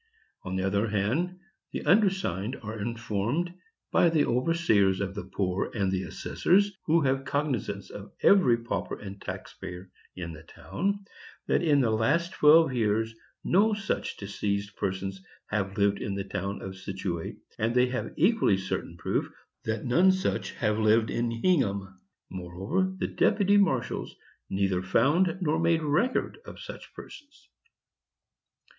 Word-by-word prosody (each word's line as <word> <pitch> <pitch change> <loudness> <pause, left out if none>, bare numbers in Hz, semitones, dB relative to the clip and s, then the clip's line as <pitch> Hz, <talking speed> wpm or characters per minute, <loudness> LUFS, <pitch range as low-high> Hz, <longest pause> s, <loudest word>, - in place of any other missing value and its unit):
On 90 +1 -5
the 95 - -1
other 100 +3 +1
hand, 120 - 0 0.3
the - - -5
undersigned 185 - +2
are 110 0 -5
informed, 115 - -2 0.4
by 170 - +5
the 160 -3 +3
overseers 120 - +2
of 100 -1 -2
the 105 -3 -6
poor 95 0 -1
and 100 -3 +1
the 95 -1 0
assessors, 200 - +1
who 165 +1 +4
have 135 -1 +1
cognizance 130 -10 -2
of 100 0 -9
every 155 -13 +6
pauper 115 0 -4
and 100 -1 -9
tax - - -7
payer 90 +1 -9 0.2
in 85 -2 -6
the 80 - -11
town, 200 - -3 0.4
that - - +2
in 150 -5 +4
the 115 -3 +2
last 150 +11 +1
twelve 150 -1 +6
years 110 -1 +1 0.3
no 210 +4 +3
such 195 -2 -3
diseased 100 0 -3
persons 95 0 -3 0.3
have 100 -1 -1
lived 100 0 +2
in 100 - -3
the 100 - -2
town 100 +1 -4
of 95 0 -7
Scituate; 95 -3 -4 0.2
and 115 +2 0
they 125 0 +5
have 125 0 -3
equally 185 - +3
certain 95 -3 -4
proof - - -1 0.4
that 110 +1 -2
none 175 +10 +5
such 190 0 -1
have 105 -2 0
lived 110 +1 +3
in 120 0 0
Hingham. 100 - 0 0.3
Moreover, 95 - -2
the - - -1
deputy 205 -1 +3
marshals 150 -12 0 0.3
neither 95 -2 0
found 165 - +2
nor 160 -2 +1
made 165 -1 +2
record 175 - 0
of - - -11
such - - -9
persons. 295 -2 -13
115 Hz, 150 wpm, -28 LUFS, -, 0.4 s, every